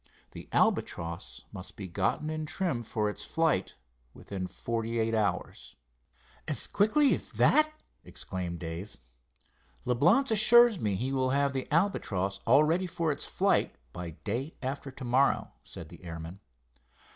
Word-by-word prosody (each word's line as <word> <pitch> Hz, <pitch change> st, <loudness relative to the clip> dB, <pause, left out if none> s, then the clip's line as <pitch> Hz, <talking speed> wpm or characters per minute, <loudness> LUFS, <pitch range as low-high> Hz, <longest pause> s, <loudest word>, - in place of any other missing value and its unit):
The -, -, -10 dB
Albatross 85 Hz, +3 st, -1 dB
must 95 Hz, -3 st, -9 dB
be 100 Hz, -, -6 dB
gotten 100 Hz, -, -1 dB
in 155 Hz, -1 st, -4 dB
trim 175 Hz, -7 st, 0 dB
for 110 Hz, -2 st, -1 dB
its 105 Hz, -, -4 dB
flight 160 Hz, -, 0 dB, 0.4 s
within 95 Hz, -2 st, -5 dB
forty 115 Hz, +3 st, -3 dB
eight 115 Hz, 0 st, +1 dB
hours." 105 Hz, -4 st, -2 dB, 0.7 s
"As -, -, 0 dB
quickly 275 Hz, +8 st, +3 dB
as -, -, -4 dB
that!" 310 Hz, 0 st, +4 dB, 0.3 s
exclaimed 90 Hz, -2 st, -5 dB
Dave. 85 Hz, +4 st, -7 dB, 0.9 s
"Leblance 175 Hz, -, +3 dB
assures 220 Hz, 0 st, +6 dB
me 105 Hz, -6 st, 0 dB
he 125 Hz, +7 st, -2 dB
will 130 Hz, -1 st, +1 dB
have 140 Hz, +1 st, +1 dB
the 130 Hz, +1 st, -4 dB
Albatross 100 Hz, -, 0 dB
all 135 Hz, +6 st, +6 dB
ready 170 Hz, +4 st, +1 dB
for 165 Hz, -2 st, -1 dB
its 145 Hz, -, -3 dB
flight -, -, +1 dB, 0.2 s
by 85 Hz, -3 st, -6 dB
day 125 Hz, +9 st, -3 dB
after 135 Hz, +2 st, -4 dB
to 130 Hz, -1 st, -8 dB
morrow," 130 Hz, +3 st, +2 dB
said -, -, -10 dB
the -, -, -14 dB
airman. 85 Hz, +2 st, -7 dB
125 Hz, 145 wpm, -29 LUFS, 95-160 Hz, 0.9 s, assures